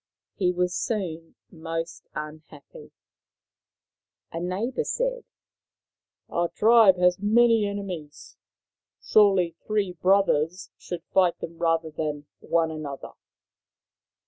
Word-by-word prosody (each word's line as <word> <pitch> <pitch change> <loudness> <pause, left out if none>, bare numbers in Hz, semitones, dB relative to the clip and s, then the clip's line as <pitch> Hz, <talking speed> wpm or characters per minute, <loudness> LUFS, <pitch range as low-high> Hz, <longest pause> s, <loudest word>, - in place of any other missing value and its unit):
He 180 -2 +1
was 180 0 -1
soon 175 -5 -3 0.2
most 165 0 -6
unhappy. 150 -1 -10 1.4
A 165 - -4
neighbour 200 - -2
said: - - -2 0.5
" - - -68
Our 170 0 -1
tribe 220 -4 +5
has 180 0 +3
many 225 +1 +4
enemies. 185 -7 -7 0.6
Surely 195 -5 +3
three 210 -3 0
brothers 180 -1 +1
should 175 -2 -7
fight 185 -3 +3
them 165 0 -8
rather 165 -1 0
than 150 -1 -4
one 165 -1 0
another.' 150 -3 -7
180 Hz, 100 wpm, -25 LUFS, 165-200 Hz, 1.4 s, tribe